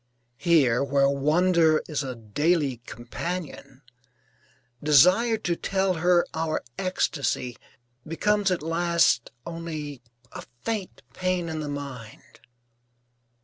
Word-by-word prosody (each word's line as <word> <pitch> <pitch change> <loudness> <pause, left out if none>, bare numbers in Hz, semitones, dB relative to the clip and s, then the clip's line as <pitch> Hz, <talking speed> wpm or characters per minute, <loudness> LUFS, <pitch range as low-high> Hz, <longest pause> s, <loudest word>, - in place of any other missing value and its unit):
Here, 140 -7 +3
where 140 0 +2
wonder 155 +3 +3
is 150 -3 -2
a 130 -3 -5
daily 140 - 0
companion, 140 +1 -6 1.0
desire 180 - +5
to 175 -5 -1
tell 190 +1 0
her 175 +1 +3
our 160 -1 -2 0.2
ecstasy 140 -9 -1 0.5
becomes 205 +5 +1
at 180 -5 -1
last 170 -6 +2 0.2
only 155 -5 -6 0.3
a - - -8 0.2
faint 215 -5 -4
pain 185 0 -1
in 160 -1 -4
the 150 -1 -4
mind. 135 -6 -8
160 Hz, 105 wpm, -25 LUFS, 140-180 Hz, 1.0 s, desire